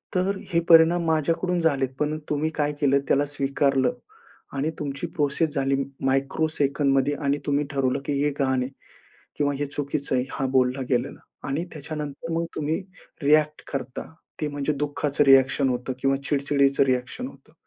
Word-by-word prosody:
तर 190 +2 +1 0.2
हे 170 - +4
परिणाम 165 +1 +7
माझ्याकडून 165 +3 +1
झालेत, 140 -5 +1
पण 150 +1 0
तुम्ही 150 +1 0
काय 150 -1 +1
केलं? 140 -1 +4
त्याला 145 +1 +3
स्वीकारलं 140 - +1 0.6
आणि 150 +4 0
तुमची 140 -2 -3
प्रोसेस 150 +1 +1
झाली 135 0 +1 0.3
मायक्रो 135 +4 +1
सेकंदमध्ये 140 0 +2
आणि 140 +1 +2
तुम्ही 145 +1 +1
ठरवलं 135 -2 0
की 145 - -1
हे 145 - +2
घाण 130 -2 0
आहे 125 - -4 0.7
किंवा 145 -1 +1
हे 145 - -1
चुकीचं 140 0 -3
आहे, 125 - +1
हा 135 - -1
बोलला 130 +1 +2
गेलेला. 120 -2 0 0.3
आणि 150 +5 -1
त्याच्यानंतर 150 +1 -6
मग 165 +1 0
तुम्ही 155 +1 -1 0.4
रिॲक्ट 150 +1 +3
करता. 135 -2 -4 0.3
ते 150 - 0
म्हणजे 145 +1 -1
दुःखाचं 145 0 0
रिॲक्शन 135 0 +5
होतं 125 +1 -2
किंवा 135 +1 +2
चिड-चिडीचं 140 -1 +2
रिॲक्शन 130 - -1
होतं. - - -18
145 Hz, 155 wpm, -25 LUFS, 135-155 Hz, 0.7 s, परिणाम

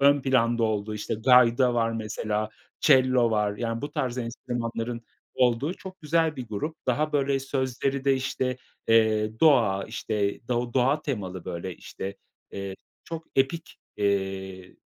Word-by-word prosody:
ön 140 +1 +5
planda 120 -3 +2
olduğu, 105 -1 -1
işte 105 +1 -3
gayda 125 +1 +5
var 115 -1 +2
mesela, 110 -1 -2 0.3
çello 130 -4 +5
var 105 -2 +1
yani 115 0 -2
bu 145 - -4
tarz 130 -3 -2
enstrümanların 120 -1 -4 0.3
olduğu 130 +6 +2
çok 190 -1 -11
güzel 160 0 +1
bir 125 -3 -6
grup. 150 +10 -3
Daha 155 0 +1
böyle 140 -1 +1
sözleri 135 0 -1
de 135 -1 +4
işte, 130 -1 -1 0.3
eee, 110 -1 +3
doğa, 115 -11 +4
işte 100 -1 -2
do 120 -1 -1
doğa 135 +4 +2
temalı 95 - -4
böyle 85 +1 -5
işte, 100 +1 -7 0.3
eee, 100 -1 -5 0.3
çok 165 -1 -6
epik, 155 +5 0 0.2
eee, 95 -2 -2
120 Hz, 140 wpm, -26 LUFS, 105-135 Hz, 0.3 s, ön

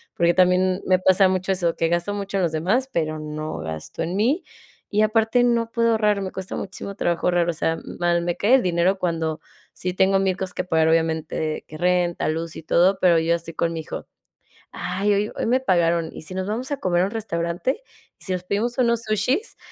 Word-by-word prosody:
porque 170 0 +3
también 185 +1 +3
me 185 - +5
pasa 190 +1 +5
mucho 185 +1 -1
eso, 175 -3 0
que 165 - +1
gasto 175 +4 0
mucho 200 -1 -3
en 190 - +1
los 170 - +1
demás, 210 +12 0
pero 155 -4 -1
no 155 0 -5
gasto 80 -1 -6
en 170 +3 -3
mí, 260 - +1 0.5
y 210 - +1
aparte 225 +3 +3
no 235 -1 +1
puedo 230 0 +2
ahorrar, 210 -2 +2
me 190 -1 -4
cuesta 190 -1 -6
muchísimo 200 0 -6
trabajo 170 -3 0
ahorrar. 175 -1 +2
O - - 0
sea, 165 +1 -1 0.2
mal, 175 0 +2
me 175 0 -1
cae 225 +6 +4
el 260 - +3
dinero 180 +2 +2
cuando 165 -3 -1 0.3
si 180 0 -4
tengo 190 +1 +3
1000 190 -1 +1
cosas 190 -1 -4
que - - -1
pagar 160 -2 +2
obviamente 160 -1 0
que 155 - -9
renta, 175 0 +1
luz 165 +1 -3
y - - -8
todo, 185 +5 +3
pero 175 -3 +5
yo 165 +1 +2
estoy 165 0 -7
con 165 +1 0
mi 165 - -4
hijo: 155 - -7 0.6
"Ay, 195 +3 -1
hoy 205 +2 0
hoy - - -2
me 250 +3 +3
pagaron 170 -6 +1
y - - -8
si 185 +4 -8
nos 190 0 -2
vamos 240 +6 -3
a 285 - 0
comer 175 -5 +1
a - - +3
un 195 - -4
restaurante 205 - -2 0.4
y - - -11
si 190 - -4
nos 180 -1 -3
pedimos 215 +7 -1
unos 235 -2 +2
sushis", 240 - -1
185 Hz, 220 wpm, -23 LUFS, 170-205 Hz, 0.6 s, me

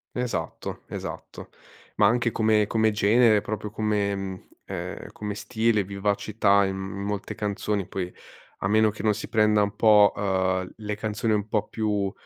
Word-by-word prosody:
Esatto 115 -10 -4
esatto, - - -8 0.5
ma 105 -2 +6
anche 120 +1 +2
come 110 -1 +3
come 110 +1 +2
genere, 110 +1 +4
proprio 105 0 -4
come 105 -1 0
mhmm, 95 -1 -6 0.2
ehm, - - -6
come 105 -1 -5
stile, 110 -2 +1
vivacità 100 +1 +1
in 95 0 -2
molte 100 +1 -4
canzoni 105 -2 -2
poi, 90 -1 -4 0.5
a - - 0
meno 110 +2 +4
che 105 - -7
non 110 -1 +3
si 110 - -7
prenda 105 -2 +3
un 100 0 -1
po', 105 -1 +6
uhm, 95 -2 0
le 105 -1 -4
canzoni 110 +1 -1
un 105 0 0
po' 105 -1 -1
più, 105 -3 -1
105 Hz, 155 wpm, -25 LUFS, 100-110 Hz, 0.5 s, ma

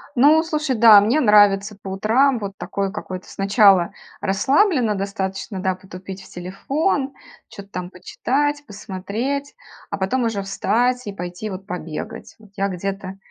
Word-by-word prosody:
Ну, 300 +6 +5
слушай, 305 -4 -1
да, 220 -2 +8
мне 230 +9 +2
нравится 205 -2 +4
по - - -10
утрам 235 +7 +2
вот 200 -2 -6
такой 190 +2 -3
какой-то 185 -3 -7
сначала 195 -3 +4 0.3
расслабленно 240 - +2
достаточно, 195 0 -4
да, 190 0 0
потупить 185 +1 -10
в - - -15
телефон, 270 - -2 0.4
чё-то 200 0 -11
там 180 -2 -5
почитать, 290 +10 -2
посмотреть, 215 +8 -4 0.3
а 200 - -3
потом 195 +7 0
уже 205 -4 -1
встать 245 +5 0
и 205 - -4
пойти, 180 +3 -6
вот, 190 0 -7
побегать, 165 -5 -7
вот. 215 -3 -19
Я 195 0 0
где-то, 195 +1 -5
200 Hz, 145 wpm, -21 LUFS, 190-245 Hz, 0.4 s, да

